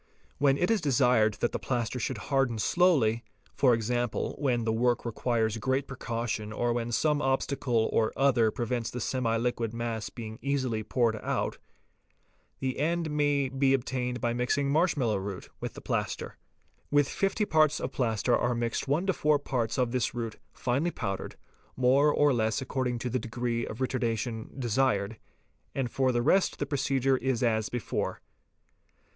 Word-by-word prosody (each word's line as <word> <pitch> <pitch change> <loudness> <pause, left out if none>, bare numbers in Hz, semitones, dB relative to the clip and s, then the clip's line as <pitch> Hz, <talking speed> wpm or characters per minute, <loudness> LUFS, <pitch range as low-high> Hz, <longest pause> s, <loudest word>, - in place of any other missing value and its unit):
When 140 -1 +4
it 180 +8 +1
is 220 -4 +2
desired 125 -7 +3
that 120 - +1
the - - -3
plaster 120 0 -2
should 125 +1 -2
harden 135 +1 0
slowly, 125 - +3 0.3
for 125 -4 +4
example, 120 +1 -1
when 125 -5 +1
the 110 0 0
work 120 +2 +1
requires 115 -1 0
great 130 +3 0
precaution 115 -4 -3
or 120 +2 0
when 120 0 -2
some 150 +4 +2
obstacle 130 -4 +1
or 110 - +2
other 120 -4 +4
prevents 120 0 -2
the - - -7
semiliquid 115 -2 -1
mass 115 -2 -3
being 110 -2 -8
easily 130 -5 -1
poured 115 0 +1
out, - - -2 1.0
the 130 -1 -2
end 165 +1 0
may 145 -2 +2
be 135 +1 +2
attained 125 -1 -2
by 120 +1 0
mixing 130 +3 0
marsh 165 +3 +2
mallow 115 -6 +1
root 95 -1 -6
with - - -5
the - - -9
plaster. - - -3 0.5
With 145 -1 +3
50 195 +5 0
parts 155 -4 +3
of - - -3
plaster 120 -1 +1
are 120 0 +1
mixed 120 +2 -2
1 150 +7 +1
to 190 - +2
4 150 -2 +3
parts 125 -5 -2
of 125 -2 +1
this 125 -1 -1
root 115 -2 -4
finely 140 +7 0
powdered, 100 - -4 0.4
more 135 +4 +4
or 145 -1 +3
less 110 -2 +1
according 130 -2 -2
to 125 +2 -3
the 130 - 0
degree 120 0 -2
of - - -6
retardation 120 -2 -2
desired, 115 -4 +1 0.6
and 130 -4 -1
for 130 -1 +2
the 120 -1 0
rest 190 +8 +3
the - - -2
procedure 135 -2 +1
is 130 -1 -1
as 110 -2 +1
before. 120 -3 -3
125 Hz, 165 wpm, -29 LUFS, 115-135 Hz, 1.0 s, When